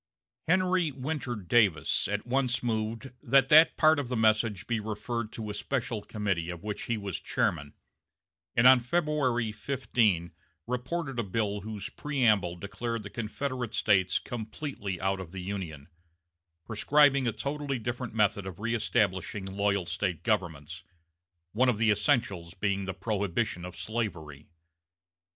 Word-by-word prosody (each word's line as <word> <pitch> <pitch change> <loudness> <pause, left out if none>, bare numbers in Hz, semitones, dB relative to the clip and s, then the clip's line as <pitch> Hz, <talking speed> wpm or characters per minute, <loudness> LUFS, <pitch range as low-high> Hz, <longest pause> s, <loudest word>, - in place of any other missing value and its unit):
Henry 180 -2 +2
Winter 135 -1 -3
Davis 100 -5 +2
at 105 +1 -2
once 125 -1 0
moved 115 +2 -2
that 135 +2 +4
that 155 +2 +7
part 155 -1 +5
of 140 - -3
the 125 - -1
message 110 -2 +2
be 115 -2 -1
referred 110 +1 -4
to 110 -2 -5
a - - -5
special 115 -1 -2
committee 100 -6 -2
of 85 -1 -6
which 105 -1 -4
he 115 - -1
was 100 -3 -4
chairman, 70 0 -1 0.8
and 120 - +4
on 130 0 +9
February 130 -5 0
15 105 -6 0 0.3
reported 125 +2 -3
a - - +1
bill 105 0 -1
whose 105 +1 -6
preamble 110 -13 +1
declared 105 +5 -4
the 100 - -8
Confederate 120 +1 -3
States 95 -3 +3
completely 110 - -5
out 95 +1 0
of 90 -3 -8
the 95 -1 -6
Union; 90 -7 -5 0.8
prescribing 140 +4 +4
a - - +2
totally 140 +3 -3
different 120 0 -4
method 105 -2 +2
of 95 - -6
reëstablishing 100 -3 -1
loyal 100 -2 +1
State 85 -2 -2
governments, 85 -10 -2 0.7
one 125 +4 +3
of 120 - +1
the 110 0 +3
essentials 105 - 0
being 100 0 -1
the 95 - -4
prohibition 100 -3 -1
of 90 0 -8
slavery. 85 -11 -4
110 Hz, 140 wpm, -29 LUFS, 95-125 Hz, 0.8 s, on